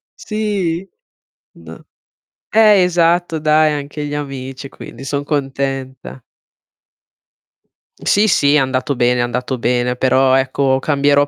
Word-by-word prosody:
Sì. 205 - -3 0.7
N - - -13 0.7
eh, 210 -3 +5
esatto 175 -1 +1
dai 155 0 +3
anche 145 +1 -5
gli 145 - -5
amici, 135 -2 -6
quindi 135 - -11
son 140 +1 -3
contenta. 135 -2 -4 1.8
Sì, 210 +2 +2
sì, 145 -5 +3
è - - +6
andato 130 +1 0
bene, 125 0 +1
è - - +2
andato 125 +1 -3
bene, 125 +1 0
però, 130 +1 +3
ecco, 135 0 +1
cambierò 145 0 +2
140 Hz, 115 wpm, -17 LUFS, 130-160 Hz, 1.8 s, è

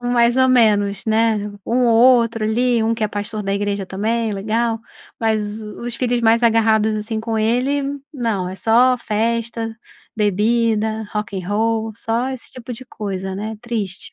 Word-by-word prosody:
mais 245 0 +2
ou 260 0 +4
menos, 205 -5 +3
né? 220 0 +2 0.3
Um 250 +2 +2
outro 230 -1 +4
ali, 235 +2 +2
um 225 +1 +1
que 225 - -5
é 215 - +1
pastor 210 +1 -4
da 195 0 -2
igreja 200 -1 -1
também, 220 +4 -1
é - - -2
legal, 225 +3 -1 0.4
mas 220 -1 -1
o 210 +2 -9
os 240 - -3
filhos 245 -1 0
mais 230 +1 +3
agarrados, 220 -2 +3
assim, 215 +1 -3
com 225 0 -2
ele 250 +6 +1 0.3
não, 225 -9 -2
é 185 - -6
só 235 +6 +4
festa, 230 0 -2 0.4
bebida, 220 +1 +1
rock 210 -2 -3
and 180 - -8
roll, 225 +1 0
só 230 +3 -1
esse 260 -3 -7
tipo 250 0 -8
de 255 +3 -9
coisa, 190 -4 -5
né? 215 +2 -5
Triste. 220 -6 -4
225 Hz, 170 wpm, -20 LUFS, 210-235 Hz, 0.4 s, ou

